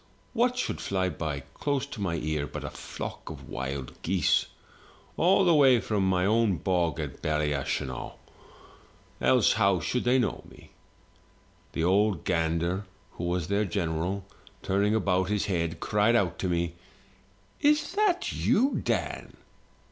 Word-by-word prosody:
what 250 +1 +2
should 255 - -2
fly 95 -1 0
by 75 -3 -4
close 140 -2 -1
to 125 -6 -8
my 90 -4 -1
ear 75 -2 -2
but - - -7
a - - -5
flock - - -7
of - - -9
wild 65 0 -4
geese, 95 +1 +2 0.7
all 190 +3 +4
the 175 - +5
way 135 -5 +6
from 105 -2 -1
my 95 -1 +2
own 110 -2 +3
bog 85 -3 0
of 75 -4 -5
Ballyashenogh, 75 -4 -1 1.1
else - - +4
how 100 -2 +3
should 125 - -1
they 125 +2 +3
know 125 - -1
me? - - -17 1.0
The 80 - -1
ould 95 -1 +2
gander, 85 +4 0 0.3
who 85 - -6
was 90 -2 -1
their 100 +2 +1
general, 90 0 -2 0.4
turning 100 +3 +2
about 95 -3 +1
his 105 0 0
head, 85 -5 -1
cried 105 +3 +2
out 95 -7 +1
to 95 - -1
me, 85 -1 0 0.9
*Is 300 +2 +3
that 400 -3 +1
you, 270 +6 +2
Dan?' - - -2
95 Hz, 145 wpm, -28 LUFS, 85-115 Hz, 1.1 s, way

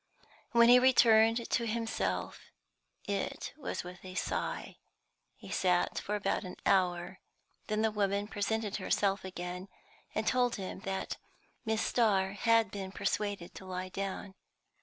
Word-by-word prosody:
When 235 0 +6
he 245 +1 +9
returned 230 -2 +5
to 235 -2 0
himself, 225 0 -2 0.7
it 200 -1 -3
was 300 - -4
with 180 0 -10
a 185 -1 -9
sigh. - - -3 0.6
He - - -11
sat 180 -1 +2
for 210 - -3
about 200 0 0
an 180 - -7
hour; 180 -1 +2 0.5
then 215 0 0
the 220 - +3
woman 200 -1 0
presented 215 0 -1
herself 195 0 +1
again, 180 0 -6 0.5
and 215 - 0
told 245 0 +2
him 190 -2 -5
that 190 0 -3 0.5
Miss 220 -1 +1
Starr 195 -5 +2
had 225 +2 +3
been 195 -2 -5
persuaded 200 -2 -2
to 190 - -10
lie 185 0 -4
down. 195 +1 -4
200 Hz, 140 wpm, -32 LUFS, 190-225 Hz, 0.7 s, he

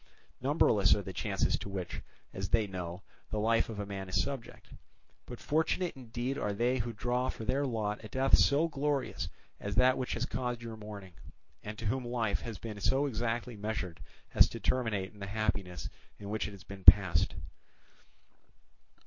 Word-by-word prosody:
Numberless - - +4
are - - -3
the - - -6
chances - - 0
to - - -6
which, 95 -3 -4 0.3
as - - -3
they 110 -2 +3
know, 90 -2 -6 0.3
the 110 - -2
life 115 +2 +2
of 105 -2 -4
man 95 -2 -5
is 90 +1 +1
subject; 130 +3 -4 0.6
but - - -8
fortunate 160 +3 0
indeed 125 +2 -3
are 105 - -1
they 120 +5 +1
who 120 0 -2
draw 125 +3 -1
for 110 - -5
their 140 +4 +1
lot 110 -3 -2
a - - -6
death 130 +5 +4
so 145 +4 +4
glorious 145 -3 -1 0.3
as 100 0 -4
that 130 0 +5
which 130 - -2
has 115 - -1
caused 125 -2 -3
your 115 -1 -6
mourning, 105 -4 -9 0.5
and 105 0 -7
to 115 - -6
whom 130 +5 0
life 120 -3 -1
has 115 -4 -6
been 105 -1 -7
so 135 +7 +2
exactly 120 -1 -2
measured 105 -5 -4 0.3
as - - +7
to - - -7
terminate 110 -7 0
in 105 - -16
the 100 - -5
happiness 100 -4 -2 0.3
in 100 0 -7
which 110 0 -1
it - - -7
has 100 0 -12
been 100 -2 -10
passed. 90 -6 +7
110 Hz, 180 wpm, -32 LUFS, 100-125 Hz, 0.6 s, as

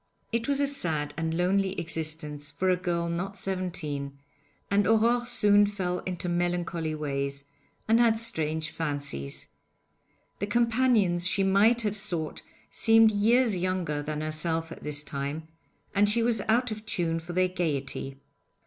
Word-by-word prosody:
It 230 0 -1
was 280 -1 +1
a 285 - +3
sad 160 - -2
and 165 0 -2
lonely 190 +1 +1
existence 155 -3 -4
for 185 +6 0
a - - +4
girl 170 -1 -2
not 185 +4 -3
seventeen, 155 -8 -3 0.5
and 200 -1 +3
Aurore 235 +2 +3
soon 205 -4 +5
fell 185 -3 -2
into 180 -1 -3
melancholy 175 -2 -1
ways, 140 -2 -3 0.4
and 225 +1 +4
had 230 -2 +4
strange 160 -8 -1
fancies. 145 - -4 0.9
The 200 - -2
companions 225 -6 +2
she 190 +2 +1
might 210 +5 +4
have 210 -1 -1
sought 175 -6 -2 0.3
seemed 225 - +5
years 225 +2 +3
younger 175 -5 -1
than 150 +1 -4
herself 160 +1 -2
at - - -9
this 150 0 -1
time, 140 +3 -4 0.5
and 205 0 +4
she 230 +2 +2
was 230 -3 +1
out 240 +1 +2
of 215 0 -6
tune 165 -4 0
for 170 +2 -8
their 185 +1 +2
gaiety. 140 -6 -2
180 Hz, 150 wpm, -27 LUFS, 155-210 Hz, 0.9 s, soon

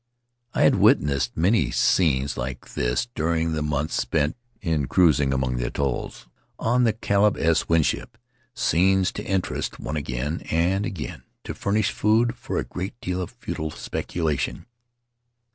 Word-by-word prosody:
I - - +3
had - - +5
witnessed 70 -4 +3
many 85 - +3
scenes 70 -5 +2
like 60 +1 -6
this - - 0
during 80 -1 0
the 80 -1 -1
months 75 0 -1
spent 75 0 0 0.2
in 80 -8 -1
cruising 75 -6 +4
among 65 -2 0
the - - -1
atolls 65 -2 -3 0.3
on 125 +2 +2
the 110 - +3
Caleb 105 -1 +2
S. 80 0 +1
Winship 85 -2 +1 0.2
— 130 -1 -39
scenes 95 +2 +3
to - - -6
interest 95 -1 -2
one 75 - -4
again 70 +3 -3
and 90 +5 +1
again 80 -7 -5
and - - -35 0.2
to - - -5
furnish 105 +1 0
food 115 +3 +2
for - - -5
a - - 0
great 95 +6 -6
deal 90 0 -2
of 90 - -4
futile 80 0 -5
speculation. 80 0 -3
80 Hz, 155 wpm, -24 LUFS, 70-95 Hz, 0.3 s, had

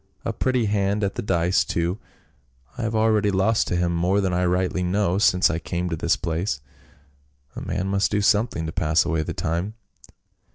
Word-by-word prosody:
" - - -34
A - - -1
pretty 130 -3 0
hand 100 0 0
at 100 - 0
the - - -4
dice 90 -2 +1
too; 85 +4 -2 0.8
I 125 - -5
have 110 -1 -2
already 110 -1 +3
lost 100 +3 +2
to - - -1
him 85 0 +1
more 90 +4 +2
than 95 -2 0
I 90 +1 +1
rightly 90 +1 0
know 95 +1 +1
since 90 -5 +4
I 80 - -2
came 90 +1 -3
to - - 0
this 85 +1 +1
place; 85 -2 -2 1.0
a - - -6
man 95 - -3
must 100 +1 +1
do 105 - 0
something 105 -4 +1
to 80 - -4
pass 80 +1 +2
away 80 -1 0
the 80 - -5
time." 85 +6 -2
95 Hz, 200 wpm, -23 LUFS, 85-105 Hz, 1.0 s, since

